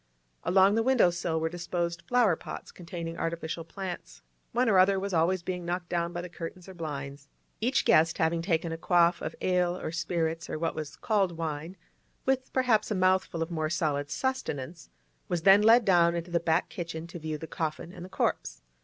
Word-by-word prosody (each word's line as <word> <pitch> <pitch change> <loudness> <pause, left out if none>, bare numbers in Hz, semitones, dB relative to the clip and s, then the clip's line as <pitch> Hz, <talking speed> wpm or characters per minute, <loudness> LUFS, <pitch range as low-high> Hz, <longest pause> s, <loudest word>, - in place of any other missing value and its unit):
Along 190 +2 +5
the 225 - +2
window 240 -7 +4
sill 170 -2 -2
were 160 - 0
disposed 170 0 -3
flower 240 -8 +4
pots - - -8
containing 170 -1 -7
artificial 165 0 -3
plants; 185 +1 -7 0.3
one 245 +1 +2
or 195 -4 +5
other 190 +1 +4
was 200 0 -4
always 170 +2 +2
being 180 0 -3
knocked 175 0 -3
down 170 -1 -1
by 175 - -4
the 180 - -6
curtains 175 +1 -8
or 190 - -9
blinds. 140 -4 -6 0.3
Each 250 +4 +1
guest 160 +1 +4
having 165 +1 +1
taken 165 -2 0
a 165 - -5
quaff 175 0 +3
of 155 - -4
ale 180 -1 +1
or - - -4
spirits 165 -1 -2
or - - -3
what 165 +1 -1
was 155 -1 -6
called 195 -6 0
wine, 165 +2 -4 0.5
with 260 -1 0
perhaps 240 -5 +2
a 215 - 0
mouthful 185 -3 +2
of 165 - -7
more 155 -2 -1
solid 145 -4 -1
sustenance, 165 - -3 0.4
was 175 -2 -2
then 195 +2 +7
led 225 +2 +6
down 170 -3 +4
into 170 +1 -4
the 170 - +2
back 165 +1 +1
kitchen 170 -2 -5
to 170 0 -9
view 155 -1 -4
the 160 - -7
coffin 160 +1 -4
and 175 - -9
the 185 - -9
corpse. 190 - -2
170 Hz, 195 wpm, -29 LUFS, 165-185 Hz, 0.5 s, then